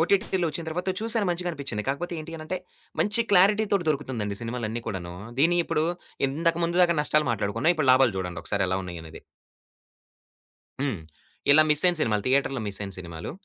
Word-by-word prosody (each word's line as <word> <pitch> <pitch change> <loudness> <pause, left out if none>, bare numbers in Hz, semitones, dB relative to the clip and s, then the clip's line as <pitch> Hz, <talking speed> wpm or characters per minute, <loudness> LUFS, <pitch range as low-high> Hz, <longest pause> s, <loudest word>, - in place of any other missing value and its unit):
ఓటిటిలో 190 0 +1
ఒచ్చిన 160 +3 -5
తర్వాత 180 +4 -3
చూశాను 225 -2 +1
మంచిగానిపించింది. 160 -11 -3
కాకపోతే 175 +6 -2
ఏంటి 165 +2 -8
అని 155 - -8
అంటే 185 - -2 0.4
మంచి 210 +3 +2
క్లారిటీతోటి 200 0 +4
దొరుకుతుందండి 130 -8 -2
సినిమాలన్ని 115 -1 -3
కూడాను. 90 -5 -5 0.2
దీన్ని 170 +5 +4
ఇప్పుడు 155 - 0 0.4
ఇంతక 165 +5 +1
ముందు 170 +1 0
దాకా 170 -1 +4
నష్టాలు 150 0 +1
మాట్లాడుకున్నాం, 105 +8 +1
ఇప్పుడు 155 -4 0
లాభాలు 130 -4 +4
జూడండి 90 -2 -4
ఒకసారెలా 95 0 0
ఉన్నాయనేది. 85 -3 -9 1.6
హ్మ్. 130 -10 -1 0.5
ఇలా 155 +2 +8
మిసైన 175 +4 +4
సినిమాలు 105 -5 +1
థియేటర్‌లో 135 -1 +1
మిసైన 100 0 -4
సినిమాలు 85 -3 -7
145 Hz, 145 wpm, -26 LUFS, 105-175 Hz, 1.6 s, ఇలా